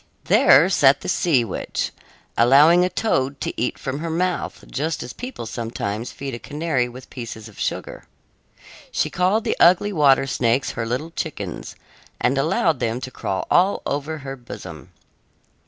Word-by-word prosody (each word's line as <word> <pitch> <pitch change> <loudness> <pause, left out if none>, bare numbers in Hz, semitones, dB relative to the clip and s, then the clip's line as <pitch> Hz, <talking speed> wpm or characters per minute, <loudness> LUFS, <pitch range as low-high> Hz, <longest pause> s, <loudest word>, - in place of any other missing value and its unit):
There 145 +7 +6
sat 140 -7 +4
the - - -7
sea 160 -8 +2
witch, 105 - -3 0.4
allowing 145 +9 +6
a 180 - +1
toad 140 -9 -1
to - - -2
eat 120 - -2
from 135 +2 -4
her 165 +1 -4
mouth 180 +3 -2
just 155 +3 -2
as 120 - -8
people 250 - -7
sometimes 115 -1 -4
feed 140 -1 -6
a 120 - -5
canary 145 -4 -1
with 125 +2 -12
pieces 115 -3 -7
of 110 - -15
sugar. - - -4 0.8
She - - 0
called 185 +5 +1
the - - 0
ugly 185 +4 +5
water 140 -5 +4
snakes 125 0 0
her 115 -2 -4
little 130 +8 -3
chickens 105 - -5 0.4
and 135 +2 +1
allowed 155 0 +1
them 115 0 -1
to 130 - -7
crawl 95 -5 -3
all 190 +3 +3
over 145 +3 -2
her 135 0 -5
bosom. 85 - -10
135 Hz, 160 wpm, -22 LUFS, 120-165 Hz, 0.8 s, There